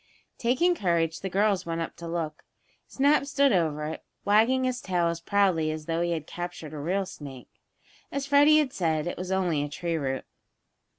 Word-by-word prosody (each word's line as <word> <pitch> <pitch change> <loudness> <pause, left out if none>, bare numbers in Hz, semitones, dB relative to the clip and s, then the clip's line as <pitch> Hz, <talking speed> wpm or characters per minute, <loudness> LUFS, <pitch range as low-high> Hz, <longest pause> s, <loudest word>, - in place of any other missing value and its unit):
Taking 260 +10 +3
courage, 170 - 0
the 190 - -4
girls 200 0 +2
went 165 0 -3
up 165 - -4
to 170 - -7
look. 165 -2 -4 0.4
Snap 280 +1 +2
stood 280 -3 +3
over 155 -4 +1
it, 155 - -5 0.2
wagging 225 +6 +4
his 255 -1 -1
tail 175 -3 +1
as 170 0 -4
proudly 185 -5 +2
as 155 0 -4
though 165 +1 -1
he 175 - 0
had 160 -3 -2
captured 175 -3 -7
a 150 - -6
real 185 +6 -1
snake. 140 -8 -11 0.5
As 280 -1 -2
Freddie 290 +2 +6
had 295 -4 +1
said, 160 -4 0
it 175 - -3
was 185 +1 -5
only 180 -6 +1
a 145 - -3
tree 165 +3 -2
root. 135 -3 -3
175 Hz, 190 wpm, -27 LUFS, 160-215 Hz, 0.5 s, Freddie